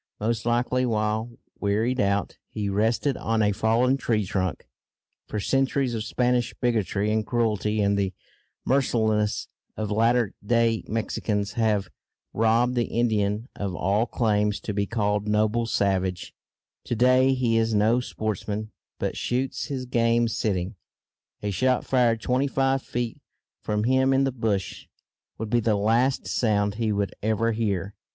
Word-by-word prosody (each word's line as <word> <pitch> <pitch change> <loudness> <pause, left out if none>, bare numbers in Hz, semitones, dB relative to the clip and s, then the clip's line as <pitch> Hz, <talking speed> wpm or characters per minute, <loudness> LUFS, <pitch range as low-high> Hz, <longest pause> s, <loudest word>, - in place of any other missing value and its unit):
Most 115 +2 -1
likely 120 +2 +1
while, 110 0 -1 0.2
wearied 110 +5 0
out, 100 -2 0
he 105 -2 -3
rested 115 +7 +1
on 110 -1 0
a 105 - +3
fallen 115 +6 +2
tree 115 -5 0
trunk 95 -2 -2 0.6
(for 105 - -3
centuries 135 +2 +1
of 110 -2 -2
Spanish 120 0 0
bigotry 105 -4 0
and 110 0 +1
cruelty 110 -2 0
and 100 0 +2
the 100 -2 0 0.5
mercilessness 110 -5 +1 0.3
of 110 -1 -3
latter 115 0 +2
day 115 0 +2
Mexicans 105 -2 -2
have 105 -3 +1 0.5
robbed 115 +3 +2
the 120 -2 +1
Indian 110 -1 0
of 100 -3 -3
all 100 +7 +1
claims 105 -3 +1
to 105 - -4
be 100 0 -1
called 105 -2 0
"noble 110 +2 +1
savage"; 95 -4 -1 0.5
to 120 - -2
day 130 +3 +4
he 120 -3 +1
is 115 -1 +1
no 110 +4 +3
sportsman, 110 -2 -4 0.3
but - - -2
shoots 130 +2 -2
his 135 -4 -4
game 115 -1 +2
sitting), 95 -4 -1 0.7
a 105 - -1
shot, 130 +6 +1
fired 120 -3 +2
twenty 130 +4 +1
five 135 0 +1
feet 120 -2 -4 0.4
from 105 0 -1
him 130 +2 +3
in 135 +1 +3
the 135 - +1
bush, 110 -6 -2 0.5
would 110 -1 -5
be 120 - +4
the 110 -2 +1
last 115 +6 +2
sound 105 -3 +1
he 110 0 -1
would 100 -2 -1
ever 110 +2 +1
hear. 100 -4 -2
110 Hz, 145 wpm, -25 LUFS, 105-120 Hz, 0.7 s, day